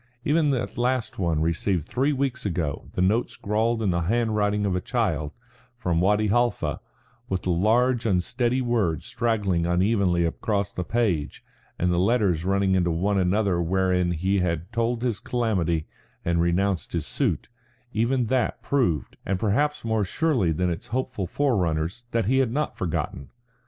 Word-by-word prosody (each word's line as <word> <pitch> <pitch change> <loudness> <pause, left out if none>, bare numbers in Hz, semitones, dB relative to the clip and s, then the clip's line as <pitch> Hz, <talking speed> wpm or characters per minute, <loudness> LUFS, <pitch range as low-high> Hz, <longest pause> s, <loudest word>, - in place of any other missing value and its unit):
Even 150 0 +3
that 125 -2 -2
last 125 -3 -1
one 85 -4 +1
received 85 0 0
three 135 +4 +1
weeks 135 -2 -1
ago, 85 -7 -3
the 90 - +1
note 110 +6 +2
scrawled 110 +2 -1
in 100 - +2
the 85 - +1
handwriting 105 +1 +1
of 95 -2 0
a 90 - -1
child, 90 - -1 0.5
from 90 -8 0
Wadi 105 +3 +3
Halfa, 105 -10 +1 0.5
with 95 -1 -2
the 90 - 0
large 115 +6 +2
unsteady 120 +7 +1
words 105 -11 0
straggling 105 -8 0
unevenly 90 -1 +2
across 100 +3 -1
the 90 - -3
page, 95 -8 -1 0.3
and 90 0 +1
the 85 - +1
letters 95 -5 +2
running 95 0 +2
into 90 -2 +2
one 95 +5 +1
another 95 -1 +1
wherein 90 0 +1
he 95 +4 +1
had 85 +1 -2
told 115 +1 -1
his 120 -5 0
calamity 90 -10 0 0.4
and 85 0 +2
renounced 90 +2 0
his - - -1
suit - - -1 0.5
even 120 +3 +1
that 125 +1 0
proved, 85 - 0
and 95 -1 -1
perhaps 145 +8 0
more 110 -2 +1
surely 125 - +1
than 90 +3 0
its 85 +8 -5
hopeful 125 -5 -2
forerunners 95 - 0
that 115 -3 0
he 130 +5 +3
had 130 -4 +2
not 150 +4 -1
forgotten. 80 -5 -3
100 Hz, 160 wpm, -25 LUFS, 85-120 Hz, 0.5 s, Even